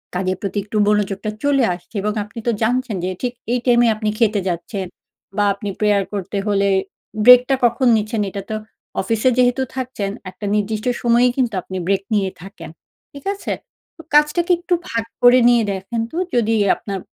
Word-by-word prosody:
কাজের 185 0 -1
প্রতি 200 0 -4
একটু 210 +1 -4
মনোযোগটা 210 0 0
চলে 280 -2 +3
আসছে। 175 +5 -12
এবং 210 +1 -1
আপনি 220 +3 -10
তো - - +4
জানছেন 245 0 0
যে 185 - -1
ঠিক 245 -1 -2 0.2
এই 250 - +1
টাইম 240 -2 +4
এ - - +4
আপনি 215 0 -2
খেতে 220 -3 +3
যাচ্ছেন 185 +3 -4 0.5
বা 205 - +3
আপনি 200 +1 -5
prayer 205 -2 +3
করতে 200 0 -4
হলে 200 -1 +2 0.6
break 250 0 +10
টা 270 - +4
কখন 240 +2 +2
নিচ্ছেন 215 +1 -2
এটা 200 - -5
তো - - -1 0.5
অফিসে 225 +5 +1
যেহেতু 250 +1 +3
থাকছেন 255 -6 -3 0.2
একটা 205 - -8
নির্দিষ্ট 210 +1 -1 0.2
সময়েই 240 +1 +4
কিন্তু 245 -4 +1
আপনি 185 +1 -7
break 195 0 +1
নিয়ে 195 -2 +1
থাকেন। 175 -3 -10 0.4
ঠিক 280 -1 -11
আছে? 400 - -4 0.4
তো - - -10
কাজটাকে 300 +4 +3
একটু 350 +1 -2 0.2
ভাগ 230 -1 -1 0.2
করে 245 +1 +7
নিয়ে 240 -1 +4
দেখেন 195 +4 -4
তো 325 - -6 0.2
যদি 225 -2 +2 0.2
আপনার, 195 -2 -5
215 Hz, 180 wpm, -20 LUFS, 200-245 Hz, 0.6 s, break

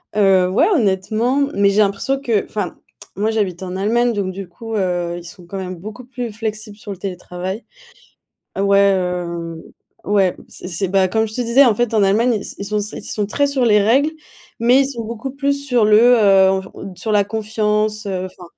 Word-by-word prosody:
Heu, 195 -3 +4
ouais, 190 - +3
honnêtement, 220 - +1 0.2
mais 200 0 +4
j'ai 200 - +1
l'impression 205 +7 0
que 230 -7 0
enfin, 205 -5 -4 0.4
moi 210 +4 0
j'habite 190 -5 -2
en 185 0 -5
Allemagne 235 +5 +1
donc 200 -3 -2
du 190 0 -7
coup, 225 +6 -7
heu, 175 -3 -1
ils 175 - -9
sont 175 +1 -12
quand 195 - -6
même 185 -1 -5
beaucoup 215 +8 -9
plus 245 -2 -5
flexibles 215 -1 -5
sur 210 - -9
le 195 - -6
télétravail. 185 +2 -5 0.9
Heu, 195 - 0
ouais, 200 0 +4
hem, 180 -4 0 0.4
ouais, 195 -3 +2
c'est - - -8
c'est 185 +2 -1
bah, 190 0 +3
comme 220 +3 +1
je 215 - -9
te 250 - -2
disais, 240 +4 +5
en 230 - +4
fait, 240 +1 -1
en 215 -2 +3
Allemagne, 220 +6 +3
ils 210 - -2
s - - -6
ils 200 - -4
sont 210 +1 -1 0.2
ils - - -7
sont 210 -1 -2
très 285 +7 +1
sur 275 -3 0
les 210 -2 +5
règles, 265 +9 +3 0.5
mais 245 +3 +4
ils 275 - +2
sont 235 -4 -5
beaucoup 235 +4 -5
plus 280 +1 0
sur 245 -5 +3
le, 210 0 +6 0.2
heu, 195 -3 +5
on 190 0 +1
v 190 0 -10
sur 220 - -3
la 205 -1 +4
confiance, 215 0 -1
heu, 185 -2 -2
enfin 185 -1 -10
205 Hz, 215 wpm, -19 LUFS, 190-225 Hz, 0.9 s, le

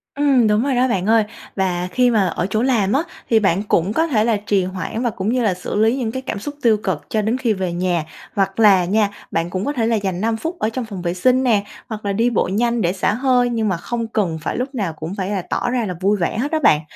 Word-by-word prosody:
Ừm, 275 -5 +3
đúng 210 +2 +2
rồi 275 -1 0
đó 250 +1 +3
bạn 190 -6 -1
ơi. 225 0 +4 0.3
Và 180 -2 -1
khi 250 +3 +3
mà 205 -4 +3
ở 180 - -2
chỗ 215 +3 0
làm 225 -6 +2
á, 280 +4 +2 0.3
thì 225 - +5
bạn 195 -1 +1
cũng 195 -1 +1
có 320 +7 +2
thể 220 -8 +2
là 225 -2 +2
trì 200 -2 0
hoãn 185 +4 -4
và 245 - +1
cũng 200 -1 -3
như 250 -1 +1
là 205 -4 +2
xử 180 - -6
lý 220 +3 +3
những 230 -4 -2
cái 260 - -4
cảm 260 - -4
xúc 290 +7 -6
tiêu 225 -3 +4
cực 180 -7 -1
cho 215 - +1
đến 225 +4 0
khi 240 -4 +1
về 185 -3 -3
nhà. 175 -2 0 0.3
Hoặc 195 +1 0
là 195 -5 +6
nha 205 +3 +2 0.2
bạn 165 +1 -1
cũng 185 +3 -3
có 290 - -1
thể 230 -4 0
là 230 - +2
dành 190 -4 -2
5 225 +1 0
phút 330 +7 -5
ở 215 - +1
trong 245 +1 -4
phòng 200 -5 -7
vệ 175 -1 -1
sinh 255 +8 +2
nè, 220 -5 +3 0.3
hoặc 215 -2 -6
là 200 - 0
đi 230 +4 +2
bộ 235 - +1
nhanh 235 +2 +1
để 175 -2 +1
xả 190 +1 0
hơi, 250 0 +2
nhưng 225 -2 0
mà 185 - 0
không 230 +6 -4
cần 195 -8 -1
phải - - -3
lúc 265 +2 -3
nào 195 -9 -2
cũng 160 +4 -6
phải 190 -2 -3
là 200 -2 -1
tỏ - - -1
ra 245 -2 0
là 185 - -3
vui 200 +2 +2
vẻ 180 +3 -1
hết 280 +5 -1
đó 315 - +1
bạn. 150 - +4
215 Hz, 285 wpm, -20 LUFS, 190-240 Hz, 0.3 s, là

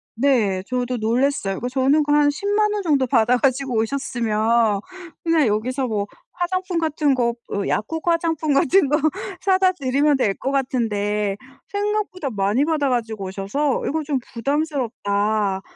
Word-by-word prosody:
네. 225 -7 +2
저도 250 0 -2
놀랐어요. 230 -3 0
그 245 - -3
저는 270 +4 +2
그 290 - -2
한 295 0 +4
100,000 410 +7 0
원 415 -1 -2
정도 285 -6 +2
받아가지고 250 +2 +2
오셨으면 225 -3 +1 0.4
그냥 330 -5 +3
여기서 250 +5 -1
뭐 210 -3 -1 0.3
화장품 365 0 -2
같은 305 -3 +1
거 235 -2 +1 0.2
뭐 200 - -2
약국 320 +11 -2
화장품 325 -3 +1
같은 285 +5 +4
거 300 - +3 0.4
사다 375 -1 +3
드리면 280 -1 +1
될 210 -6 +1
것 270 - -3
같은데 210 -7 -1 0.3
생각보다 405 -6 -2
많이 205 +3 +1
받아 300 -3 +1
가지고 225 -5 -2
오셔서 200 +10 -1
'이거 315 +2 -1
좀 280 -2 -1
부담스럽다.' 220 -7 -1
265 Hz, 295 characters per minute, -21 LUFS, 220-305 Hz, 0.4 s, 한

